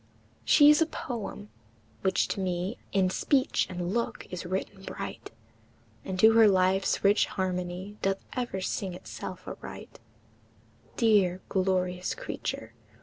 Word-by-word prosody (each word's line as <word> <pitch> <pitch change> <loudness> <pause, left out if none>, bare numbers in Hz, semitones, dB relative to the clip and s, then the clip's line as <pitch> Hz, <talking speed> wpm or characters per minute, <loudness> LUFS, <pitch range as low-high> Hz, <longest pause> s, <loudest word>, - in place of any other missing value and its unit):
She 290 -1 +7
is 300 - +4
a 325 - +4
poem, 220 -7 -6 0.5
which 190 -1 +2
to - - -2
me 185 +3 -2
In 190 -2 +2
speech 270 +7 +1
and 180 0 -3
look 235 0 -2
is 180 -1 -5
written 190 +1 -3
bright, 195 +1 -7 0.7
And 185 -1 -4
to 220 +3 +8
her 225 -1 +7
life's 190 0 +2
rich 200 +1 +4
harmony 185 +2 -3
Doth 195 0 +1 0.2
ever 240 -7 -3
sing 185 -1 -3
itself - - -8
aright; - - -9 1.0
Dear, 200 -6 +3
glorious 185 -1 0
creature! 115 0 -5
190 Hz, 130 wpm, -28 LUFS, 185-210 Hz, 1.0 s, to